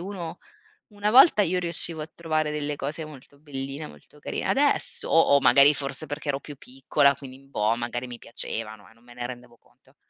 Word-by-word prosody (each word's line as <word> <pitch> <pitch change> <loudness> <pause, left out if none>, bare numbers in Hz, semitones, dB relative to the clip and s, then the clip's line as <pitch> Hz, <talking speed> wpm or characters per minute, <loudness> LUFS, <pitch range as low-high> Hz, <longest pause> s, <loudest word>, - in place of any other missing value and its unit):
uno 180 -3 -7 0.5
una 205 -1 -3
volta 250 -1 +6
io 185 -1 0
riuscivo 170 -2 +4
a 155 - -6
trovare 155 -2 -2
delle 150 -1 -3
cose 145 +3 -5
molto 140 -2 -14
belline, 140 0 -7
molto 75 - -18
carine, - - -5
adesso - - +1
o - - +4 0.2
o - - +2
magari 140 +4 +6
forse 140 +1 -6
perché 145 +1 -7
ero 140 -1 -1
più 145 +1 -11
piccola, 135 +2 0
quindi 130 -2 -12
boh, 110 -3 0
magari 120 +1 -4
mi 120 -1 -10
piacevano 110 -3 -3
e 100 - -20
non 115 +1 -27
me 120 0 -17
ne 120 0 -5
rendevo 120 -1 -10
conto, - - -30
140 Hz, 195 wpm, -25 LUFS, 125-155 Hz, 0.5 s, volta